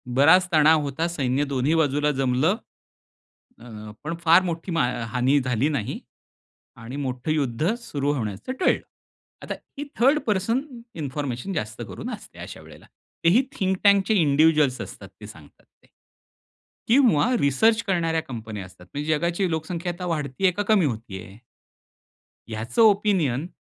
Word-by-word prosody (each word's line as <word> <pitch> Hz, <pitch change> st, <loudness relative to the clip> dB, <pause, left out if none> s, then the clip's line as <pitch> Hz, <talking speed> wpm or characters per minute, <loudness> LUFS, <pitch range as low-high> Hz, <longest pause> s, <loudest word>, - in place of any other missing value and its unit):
बराच 160 Hz, +7 st, +6 dB
तणाव 155 Hz, 0 st, +5 dB
होता, 145 Hz, +3 st, -2 dB
सैन्य 140 Hz, -5 st, -1 dB
दोन्ही 140 Hz, +2 st, 0 dB
बाजूला 150 Hz, -1 st, +2 dB
जमलं. 135 Hz, +6 st, +1 dB, 1.0 s
अ, 110 Hz, -3 st, -10 dB
पण 165 Hz, +3 st, -3 dB
फार 170 Hz, +2 st, +6 dB
मोठी 170 Hz, 0 st, -4 dB
मा 165 Hz, -6 st, +2 dB, 0.3 s
हानी 130 Hz, +3 st, +3 dB
झाली 130 Hz, +1 st, 0 dB
नाही. 140 Hz, -9 st, -3 dB, 0.8 s
आणि 120 Hz, +2 st, -9 dB
मोठं 130 Hz, +1 st, -3 dB
युद्ध 150 Hz, -, 0 dB
सुरू 145 Hz, -, -2 dB
होण्याचं 110 Hz, -, -4 dB
टळलं. -, -, +3 dB, 0.6 s
आता -, -, -4 dB, 0.2 s
ही 290 Hz, -, -4 dB
थर्ड 275 Hz, +5 st, +4 dB
पर्सन 215 Hz, +5 st, +1 dB, 0.3 s
इन्फॉर्मेशन 145 Hz, +1 st, -4 dB
जास्त 110 Hz, -8 st, -4 dB
करून -, -, -7 dB
असते. -, -, -11 dB
अशा -, -, -9 dB
वेळेला -, -, -15 dB, 0.4 s
तेही 175 Hz, +9 st, +5 dB
थिंक 190 Hz, -1 st, -1 dB
टैंकचे 200 Hz, +1 st, +4 dB
इंडिव्हिज्युअल्स 150 Hz, -4 st, +3 dB
असतात, -, -, -9 dB
ते -, -, -8 dB
सांगतात -, -, -16 dB
ते. -, -, -32 dB, 1.0 s
किंवा, 235 Hz, -, +4 dB
रिसर्च 220 Hz, -, +3 dB
करणाऱ्या 165 Hz, -4 st, +1 dB
कंपन्या 110 Hz, -5 st, -7 dB
असतात 90 Hz, -1 st, -16 dB
म्हणजे, 150 Hz, +2 st, -4 dB
जगाची 170 Hz, +4 st, 0 dB
लोकसंख्या 165 Hz, +2 st, -3 dB
आता 180 Hz, +1 st, -7 dB
वाढती 150 Hz, -2 st, -3 dB
आहे 185 Hz, -, +5 dB
का 205 Hz, -, -2 dB
कमी 205 Hz, -6 st, +4 dB
होती 110 Hz, -7 st, -4 dB
आहे? 100 Hz, +1 st, -14 dB, 1.1 s
ह्याचं 115 Hz, -, -2 dB
ओपिनियन 195 Hz, -, +3 dB
150 Hz, 140 wpm, -24 LUFS, 130-180 Hz, 1.1 s, बराच